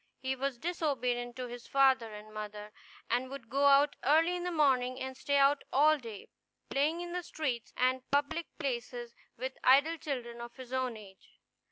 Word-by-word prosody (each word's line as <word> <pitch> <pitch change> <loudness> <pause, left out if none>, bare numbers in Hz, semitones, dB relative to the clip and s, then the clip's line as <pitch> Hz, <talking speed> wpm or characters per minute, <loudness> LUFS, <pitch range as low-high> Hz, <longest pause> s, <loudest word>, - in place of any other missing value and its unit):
He 265 0 -2
was 270 -1 -2
disobedient 250 -7 -1
to 255 - -4
his 245 0 -9
father 265 -4 +3
and 210 0 -10
mother, 210 0 -7 0.3
and 250 +2 0
would 270 -4 -9
go 280 +1 +2
out 280 +1 +5
early 325 +5 +4
in 355 - -4
the 360 - -1
morning 260 -6 +2
and 260 0 -5
stay 285 +2 0
out 280 +1 +4
all 300 +3 +5
day, 225 -6 -9 0.4
playing 305 +5 +1
in 350 0 -6
the 360 0 -2
streets 270 -9 -3
and 255 +1 +2
public 290 +4 0
places 245 -4 -4 0.2
with 260 +2 -5
idle 285 +6 +5
children 240 -6 -5
of 235 0 -8
his 260 -1 -10
own 255 -3 -1
age. 195 -3 -15
260 Hz, 180 wpm, -32 LUFS, 240-285 Hz, 0.4 s, out